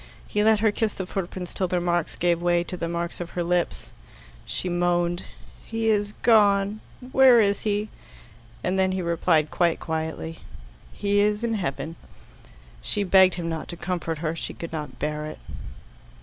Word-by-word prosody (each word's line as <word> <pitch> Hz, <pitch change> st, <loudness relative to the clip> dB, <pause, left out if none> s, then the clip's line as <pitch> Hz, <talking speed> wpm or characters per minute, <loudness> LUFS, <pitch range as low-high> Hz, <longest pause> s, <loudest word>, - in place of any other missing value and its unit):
He 210 Hz, -, 0 dB
let 220 Hz, -1 st, +4 dB
her 220 Hz, -1 st, +4 dB
kiss 215 Hz, 0 st, -1 dB
the 190 Hz, -, -4 dB
footprints 180 Hz, -1 st, -5 dB
till 185 Hz, -, 0 dB
their 180 Hz, 0 st, 0 dB
marks 175 Hz, -1 st, 0 dB
gave 170 Hz, -1 st, +1 dB
way 175 Hz, 0 st, +2 dB
to 180 Hz, -, -6 dB
the 170 Hz, -1 st, -3 dB
marks 170 Hz, +1 st, -3 dB
of 175 Hz, -, -5 dB
her 175 Hz, -, +1 dB
lips. 175 Hz, 0 st, -1 dB, 0.6 s
She 130 Hz, +9 st, -3 dB
moaned. 175 Hz, 0 st, 0 dB, 0.4 s
"He 225 Hz, 0 st, -1 dB
is 205 Hz, -1 st, +1 dB
gone 205 Hz, -2 st, +4 dB, 0.3 s
where 260 Hz, -3 st, +7 dB
is 200 Hz, -2 st, +3 dB
he?" 210 Hz, 0 st, -1 dB, 0.8 s
and 185 Hz, +1 st, 0 dB
then 190 Hz, 0 st, +2 dB
he 185 Hz, -, -1 dB
replied 160 Hz, -2 st, +2 dB
quite 170 Hz, -2 st, +2 dB
quietly, 160 Hz, 0 st, -4 dB, 0.5 s
"He 205 Hz, 0 st, 0 dB
is 210 Hz, +2 st, +2 dB
in 235 Hz, -1 st, 0 dB
heaven." 165 Hz, -5 st, -3 dB, 0.8 s
She 205 Hz, -, -1 dB
begged 190 Hz, -1 st, +6 dB
him 170 Hz, -1 st, -4 dB
not 165 Hz, -1 st, -4 dB
to 170 Hz, -, -7 dB
comfort 170 Hz, -2 st, -3 dB
her; 155 Hz, +2 st, -1 dB
she -, -, -5 dB
could 170 Hz, -, -7 dB
not 150 Hz, -2 st, -5 dB
bear 150 Hz, +1 st, -3 dB
it. 155 Hz, -, -7 dB
180 Hz, 175 wpm, -25 LUFS, 170-205 Hz, 0.8 s, where